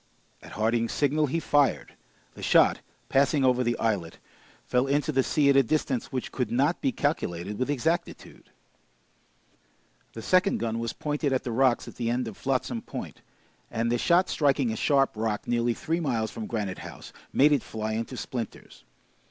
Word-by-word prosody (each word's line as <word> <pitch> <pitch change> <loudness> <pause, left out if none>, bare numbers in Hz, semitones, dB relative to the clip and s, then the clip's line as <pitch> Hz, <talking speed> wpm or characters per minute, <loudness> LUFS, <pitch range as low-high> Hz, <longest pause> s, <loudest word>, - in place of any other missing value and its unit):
At - - -12
Harding's 115 +2 0
signal, 150 +1 +1
he 165 +5 -1
fired. 145 -3 +1 0.4
The - - -12
shot, - - +4 0.3
passing 140 +1 +3
over 125 0 +3
the 120 0 0
islet, 100 -8 -1 0.5
fell 125 +2 +1
into 145 +3 +1
the 135 -2 +3
sea 145 +2 +1
at - - +2
a 135 - +7
distance 135 -1 -1
which 130 -1 -4
could 125 -4 -2
not 140 +8 +1
be 270 - +1
calculated 105 - -2
with 130 - -1
exactitude. 160 +5 -3 1.6
The 115 - -8
second 185 - +3
gun 115 0 -2
was 115 0 -2
pointed 145 -2 -2
at 130 - 0
the 120 - -4
rocks 125 +1 +2
at - - -11
the 115 -1 -1
end 120 0 -1
of 110 - -7
Flotsam - - -2
Point, - - -8 0.5
and 115 +1 -1
the 120 - +1
shot 175 +6 +3
striking 140 -5 +1
a - - -3
sharp 135 +3 +2
rock 110 -1 -2
nearly 120 0 +1
three 165 +7 -2
miles 115 -9 -1
from 110 -2 -6
Granite 105 -5 -3
House, - - -10 0.2
made 145 +3 +5
it 145 -4 +3
fly 110 0 -4
into 115 +3 -4
splinters. 120 -4 -6
125 Hz, 175 wpm, -27 LUFS, 115-145 Hz, 1.6 s, a